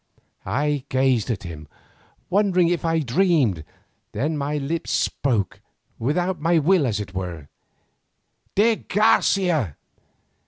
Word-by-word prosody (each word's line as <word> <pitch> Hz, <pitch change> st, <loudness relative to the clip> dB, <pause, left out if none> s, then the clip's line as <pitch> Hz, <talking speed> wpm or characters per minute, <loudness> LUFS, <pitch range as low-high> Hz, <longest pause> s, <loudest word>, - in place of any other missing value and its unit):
I 145 Hz, 0 st, 0 dB
gazed 130 Hz, -4 st, +1 dB
at 115 Hz, -5 st, -2 dB
him, 80 Hz, -4 st, -8 dB, 0.6 s
wondering 185 Hz, -3 st, +2 dB
if 175 Hz, -1 st, -1 dB
I 165 Hz, -1 st, +1 dB
dreamed, 140 Hz, -, +2 dB, 0.5 s
then 155 Hz, +4 st, -1 dB
my 145 Hz, +1 st, -2 dB
lips 155 Hz, +4 st, -3 dB
spoke, 115 Hz, -9 st, -1 dB, 0.4 s
without 175 Hz, +8 st, -1 dB
my 170 Hz, +2 st, +3 dB
will 160 Hz, -1 st, +3 dB
as 110 Hz, -3 st, -1 dB
it 100 Hz, -2 st, -6 dB
were: 85 Hz, -6 st, -5 dB, 1.1 s
"_De 220 Hz, +2 st, +2 dB
Garcia! 180 Hz, -, +2 dB
150 Hz, 115 wpm, -23 LUFS, 115-175 Hz, 1.1 s, my